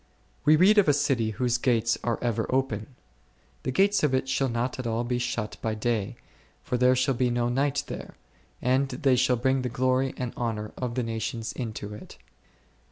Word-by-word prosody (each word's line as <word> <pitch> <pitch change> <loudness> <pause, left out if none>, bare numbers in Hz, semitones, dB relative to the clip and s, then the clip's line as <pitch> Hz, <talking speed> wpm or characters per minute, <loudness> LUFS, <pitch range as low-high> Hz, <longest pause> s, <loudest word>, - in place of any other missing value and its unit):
We 155 - +7
read 195 +6 +6
of 200 - +3
a 145 - +5
city 135 -6 +1
whose 120 +2 0
gates 115 -2 +2
are 120 -1 0
ever 115 -2 0
open; 130 -2 -1 0.7
The - - -2
gates 200 +8 +3
of 145 -3 +2
it 130 - 0
shall 135 0 +1
not 120 +2 -2
at 125 - -3
all 115 +1 0
be 120 0 -1
shut 115 -3 -3
by 110 -1 -1
day, 110 -2 -1 0.5
for - - -2
there 125 +1 +4
shall 130 +1 +2
be 125 0 +1
no 120 0 0
night 140 +3 0
there; - - -8 0.5
and 130 +2 +2
they 135 -4 +2
shall 125 0 +3
bring 130 +2 +1
the 125 - -2
glory 130 +2 +1
and 125 -2 -4
honour 110 -3 -3
of 125 -2 -4
the 125 - 0
nations 115 0 -3
into 110 -4 -5
it 105 - -10
s - - -29
125 Hz, 200 wpm, -27 LUFS, 115-130 Hz, 0.7 s, We